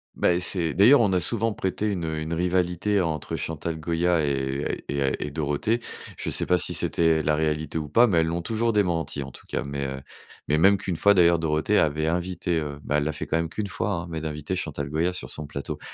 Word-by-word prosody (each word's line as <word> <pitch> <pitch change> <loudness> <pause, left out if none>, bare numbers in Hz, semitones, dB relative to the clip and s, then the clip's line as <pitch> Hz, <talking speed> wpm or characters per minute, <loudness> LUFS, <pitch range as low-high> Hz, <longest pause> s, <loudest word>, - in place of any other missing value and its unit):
bah, 90 0 +2
c'est 85 -4 -1
d'ailleurs, 120 +8 +7
on 105 - +3
a 90 - +3
souvent 115 +4 0
prêté 100 +3 -2
une, 90 -5 -2
heu, 80 -1 -2
une 80 +2 -3
rivalité 90 +3 +1
entre 80 -4 -2
Chantal 80 0 -4
Goya 85 0 +1
et 70 0 -2
et 70 0 -2
heu 65 - +2
et 75 - -5
Dorothée. 75 +9 0 0.4
Je - - -2
sais - - -1
pas 90 -1 +3
si - - +1
c'était 80 -2 +2
la 75 - +2
réalité 80 +1 -1
ou 75 -2 -6
pas, 120 +10 +6
mais 90 -8 +2
elles 80 - +2
l'ont 85 +1 -2
toujours 115 +3 0
démenti, 85 -7 0
en 70 - -9
tout - - -16
cas. - - -2
Mais, 70 0 -4
heu, 65 0 -5 0.5
mais 75 +2 +2
même 100 +3 +6
qu'une 95 -3 -3
fois, 100 +3 +5
d'ailleurs, 85 -1 +5
Dorothée 80 +6 +1
avait 75 0 +1
invité, 85 0 -1
heu- 75 -2 -5
bah, 75 - 0
elle 75 - 0
l'a 80 - 0
fait 75 - -5
quand 80 - 0
même 85 -1 -1
qu'une 105 - -3
fois, 100 - -2
hein- - - -9
mais 80 -1 -3
d'inviter 75 +3 -4
Chantal 70 -5 -4
Goya 85 +4 0
sur - - -7
son 75 0 -6
plateau. 70 -1 -5
80 Hz, 235 wpm, -25 LUFS, 75-90 Hz, 0.5 s, d'ailleurs